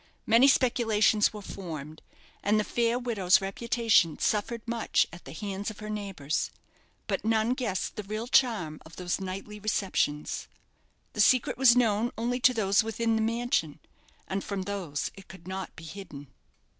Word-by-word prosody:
Many 230 +5 +6
speculations 225 -5 +3
were 210 -1 -9
formed, 155 -6 -7 0.4
and 210 +1 +2
the - - +1
fair 235 +2 +1
widow's 220 -7 +3
reputation 205 -4 +2
suffered 225 +2 -1
much 230 -1 +1
at 175 - -12
the 135 - -9
hands 200 +4 -4
of 215 - -9
her 215 0 -6
neighbours; 195 -9 -2 0.6
but - - -2
none 220 +2 +2
guessed 240 -8 -2
the - - -2
real 215 +3 -4
charm 215 - +2
of 160 - -14
those 180 +1 -2
nightly 195 +3 -6
receptions. 195 -8 -1 0.7
That - - +1
secret 255 -2 +4
was 255 -2 +6
known 225 -1 +2
only 240 +2 -1
to 255 +1 +5
those 200 -2 +3
within 225 +1 0
the 220 - +1
mansion; 230 - 0 0.5
and 190 +1 -2
from 200 -2 -3
those 185 -8 -3
it 195 - -14
could 175 -1 -13
not 190 -1 -5
be 165 - -11
hidden. 155 -5 -9
210 Hz, 160 wpm, -28 LUFS, 185-230 Hz, 0.7 s, Many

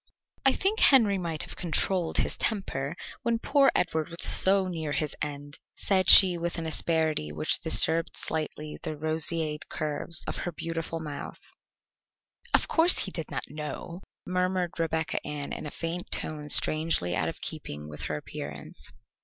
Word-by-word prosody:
"I 270 - +4
think 405 +3 -1
Henry 220 -8 +5
might 165 -3 -2
have - - -8
controlled 175 0 -1
his - - +1
temper, 170 -9 -2 0.3
when 235 -2 0
poor 275 +3 +2
Edward 160 -2 -1
was 170 0 0
so 190 0 +4
near 160 -4 -4
his 150 -2 -1
end," 145 0 -7 0.2
said 190 -2 +1
she 180 -3 +10
with 170 +1 -3
an 165 - -5
asperity 160 - +1
which 75 +1 +3
disturbed 165 +1 0
slightly 155 -1 -5
the 155 -2 -5
roseate 155 0 +1
curves 155 +3 -4
of - - -4
her 175 - -4
beautiful 165 0 -5
mouth. 150 -3 -9 1.0
"Of - - +2
course 335 +2 +5
he 190 - -6
did 165 -4 -7
not - - -4
know," 155 +4 -7 0.2
murmured 180 -1 -2
Rebecca 160 -2 -2
Ann 145 -1 -6
in - - -6
a - - -4
faint 165 +3 -5
tone 150 -1 -2
strangely 155 - +3
out - - -1
of - - -9
keeping 75 +1 -7
with 75 0 -8
her 75 - -2
appearance. 75 0 -9
160 Hz, 160 wpm, -27 LUFS, 150-180 Hz, 1.0 s, she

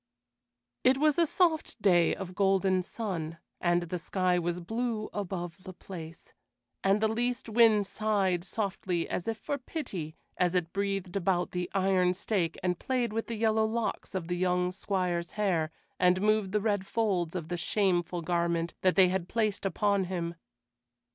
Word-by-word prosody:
It 260 +1 +5
was 305 +2 +3
a 335 - +4
soft 325 -6 +1
day 175 -5 +4
of 185 -2 -6
golden 190 -1 +2
sun, 175 -5 -4 0.2
and 175 0 +2
the 175 +1 -4
sky 180 +1 +1
was 175 0 -2
blue 225 +4 -3
above 185 -3 -4
the 185 - -8
place, 165 -4 -10 0.5
and 195 +2 +4
the 220 - +4
least 240 +3 -1
wind 220 -2 +5
sighed 195 -4 0
softly 190 -4 -2
as 180 - -3
if 225 -1 -1
for 285 +5 -3
pity 190 - -5 0.2
as 180 0 +2
it 170 -2 0
breathed 195 -2 -2
about 180 -2 +1
the 180 0 -3
iron 185 -2 +3
stake 180 -4 -1
and 180 -2 0
played 245 -4 -1
with 225 +1 -2
the 230 - -3
yellow 220 0 +3
locks 225 -2 -3
of 175 -3 -2
the 175 0 -1
young 180 0 +1
Squire's 180 -3 -2
hair 180 -7 +1 0.3
and 180 0 +4
moved 210 -1 +2
the 210 0 +1
red 205 -3 0
folds 190 -7 0
of 170 -3 -4
the 175 - -1
shameful 175 -3 0
garment 170 0 0
that 185 -1 +3
they 185 -2 +6
had 185 -1 -2
placed 215 -3 0
upon 200 +1 +1
him. 170 -2 -3
190 Hz, 165 wpm, -30 LUFS, 175-215 Hz, 0.5 s, they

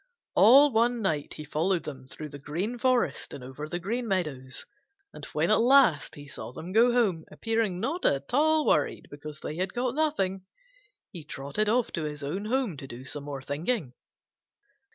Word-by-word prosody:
All 275 +5 +7
one 235 0 +2
night 155 -6 -1
he 155 - -7
followed 165 +4 0
them 130 -3 -8
through 150 +3 -8
the 145 0 -9
Green 185 - -3
Forest 255 -1 +1
and 135 - -9
over 130 +4 -7
the 175 - -2
Green 230 +7 -2
Meadows, 150 -10 -2 0.5
and - - -8
when - - 0
at - - +5
last 245 - +4
he 145 0 -11
saw 130 - -7
them 165 +7 -8
go 235 +3 +6
home, 205 -10 +2
appearing 225 -5 -1
not 290 - -2
at 140 - +1
all 310 +2 +4
worried 150 - +1
because 150 +1 -9
they 155 - -5
had 185 +5 -2
caught 245 0 0
nothing, 255 -12 0 0.7
he 170 -5 -8
trotted 145 +9 -2
off 240 +1 +2
to 160 - -3
his 150 -1 -5
own 185 +9 -3
home 235 - 0
to 135 - -8
do 125 +1 -9
some 140 +2 -6
more 140 -2 -6
thinking. 150 - -2
180 Hz, 185 wpm, -28 LUFS, 145-235 Hz, 0.7 s, All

